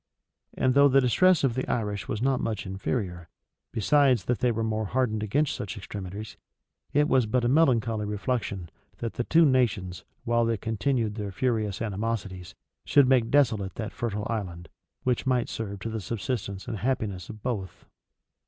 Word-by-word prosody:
And 130 -1 +2
though 140 +1 +7
the 135 0 +5
distress 165 +7 +4
of 135 -4 +2
the 130 +2 -2
Irish 105 -4 -2
was 110 +2 -2
not 135 -1 +2
much 110 -3 -2
inferior,[*] 95 -3 -3 0.4
besides 130 -2 +3
that 125 - 0
they 125 - +2
were 115 0 -1
more 110 0 -1
hardened 110 -1 0
against 140 +8 +1
such 100 +1 -5
extremities, 100 +1 -7 0.5
it 150 +1 +3
was 130 -6 +3
but 125 +2 +1
a - - +3
melancholy 115 -7 +3
reflection, 105 -4 -3 0.3
that 115 - -4
the 120 - -2
two 165 +6 +5
nations, 105 - +1 0.2
while 120 0 +2
they 115 -1 +1
continued 110 +2 -1
their 105 -2 -4
furious 110 -2 -1
animosities, 100 -4 -4 0.3
should 140 -3 +5
make 125 -3 +3
desolate 115 -9 +2
that 110 -2 -5
fertile 110 -4 -3
island, 90 -7 -4 0.3
which 125 0 0
might 125 -2 +1
serve 100 -3 -4
to 115 - -3
the 110 -1 -3
subsistence 100 -3 -4
and 110 - -3
happiness, 110 -7 -2
of 110 -2 -10
both. 105 -8 -4
115 Hz, 170 wpm, -27 LUFS, 100-130 Hz, 0.5 s, though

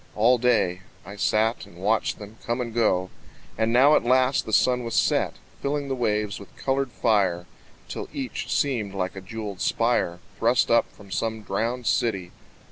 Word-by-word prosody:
All 120 +4 +4
day 110 -7 +2 0.2
I 100 +3 -9
sat 110 +4 +1
and 85 - -16
watched 105 +5 0
them 105 +1 -11
come 120 +1 -2
and 120 -2 -3
go; 95 -6 +1 0.4
And 110 +1 +1
now 135 +5 +6
at - - +2
last 130 +2 +2
the - - -4
sun 125 +3 +3
was 115 -1 -4
set, - - +2 0.3
Filling 140 0 -2
the 135 - 0
waves 105 -4 -1
with 100 -3 -14
colored 135 -1 -1
fire 95 -8 +1 0.4
Till - - -6
each 130 -2 -5
seemed 115 -8 0
like 90 -1 -2
a 95 - -7
jewelled 100 0 -6
spire 115 -7 +1 0.2
Thrust 120 +2 +3
up 115 0 +3
from 100 -2 -16
some 110 +2 -2
drowned 115 +5 -2
city. 110 -6 0
110 Hz, 175 wpm, -25 LUFS, 100-125 Hz, 0.4 s, now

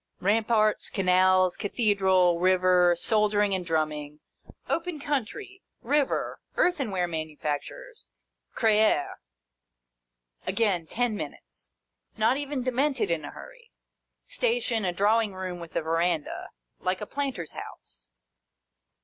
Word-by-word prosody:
Ramparts, 215 +2 +2
canals, 185 -1 +3
cathedral, 190 -5 +2
river, 180 -1 +4
soldier 210 +1 +2
ing 205 -1 +2
and 185 -1 -1
drumming, 155 -3 -2 0.5
open 335 -1 -2
country, 300 - -4 0.2
river, 280 +3 0 0.2
earthenware 220 - +1
manufactures, 160 - -5 0.5
Creil. 215 - +3 1.3
Again 195 -8 +1
ten 240 +2 -1
minutes. - - -9 0.5
Not 220 +4 +3
even 285 -2 -3
Demented 255 - 0
in 165 -2 -1
a - - -6
hurry. - - -13 0.6
Station, 470 - 0
a 180 - +1
drawing 205 +2 +2
room 185 -1 -5
with 170 -1 -10
a - - 0
verandah: 165 0 -1 0.3
like 185 0 -1
a - - -3
planter's 265 - -4
house. 60 0 -10
205 Hz, 105 wpm, -27 LUFS, 175-250 Hz, 1.3 s, river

